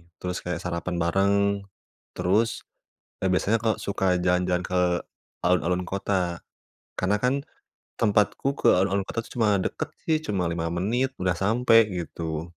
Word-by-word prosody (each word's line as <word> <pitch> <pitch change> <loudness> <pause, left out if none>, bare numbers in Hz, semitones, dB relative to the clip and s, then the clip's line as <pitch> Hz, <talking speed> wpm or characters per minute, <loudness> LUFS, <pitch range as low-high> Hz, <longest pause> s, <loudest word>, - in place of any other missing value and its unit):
terus 90 0 -4
kayak 90 -1 -4
sarapan 90 0 -3
bareng, 95 +4 +2 0.8
terus, 100 +6 +1 0.6
e - - -1
biasanya 105 +5 +2
kalau 110 -1 +1
suka 100 -1 -2 0.2
jalan-jalan 90 0 +1
ke 90 - 0 0.7
alun-alun 90 0 +2
kota. 95 -3 -1 0.6
Karena 100 +3 +1
kan 125 - +3 0.6
tempatku 105 +3 +1
ke - - +2
alun-alun 95 +1 +1
kota 115 - -3
cuma 110 -4 +2
deket - - -3 0.2
sih, 160 -1 +2
cuma 90 -5 0
5 85 0 -2
menit, 115 +10 -1
udah 90 0 +2
sampai, 115 +1 +5
gitu. 80 -2 -4
95 Hz, 135 wpm, -26 LUFS, 90-105 Hz, 0.8 s, sampai